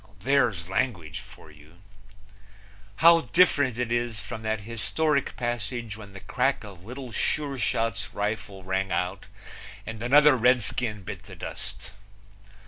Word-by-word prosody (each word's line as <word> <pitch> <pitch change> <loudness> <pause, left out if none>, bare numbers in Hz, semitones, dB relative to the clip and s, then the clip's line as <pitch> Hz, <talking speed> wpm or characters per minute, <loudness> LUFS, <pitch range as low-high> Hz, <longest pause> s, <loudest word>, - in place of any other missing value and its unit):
There's 120 -8 +2
language 90 -6 -2
for 80 - -14
you! 75 +3 -18 1.3
How 170 0 +9
different 145 -9 +3
it 120 -1 -2
is 120 -2 0
from 105 +2 -6
that 110 -1 -2
historic 140 +7 0
passage 120 -2 -3
when 100 -2 -11
the 95 - -8
crack 130 +3 0
of 95 -5 -11
Little 125 +3 -8
Sure 140 +3 0
Shot's 115 -3 -1
rifle 100 -2 -3
rang 95 +1 -1
out 90 +2 -2 0.6
and 110 -1 -7
another 145 +4 +6
Redskin 120 -3 +2
bit - - -7
the - - -11
dust. - - -7
115 Hz, 135 wpm, -27 LUFS, 100-125 Hz, 1.3 s, How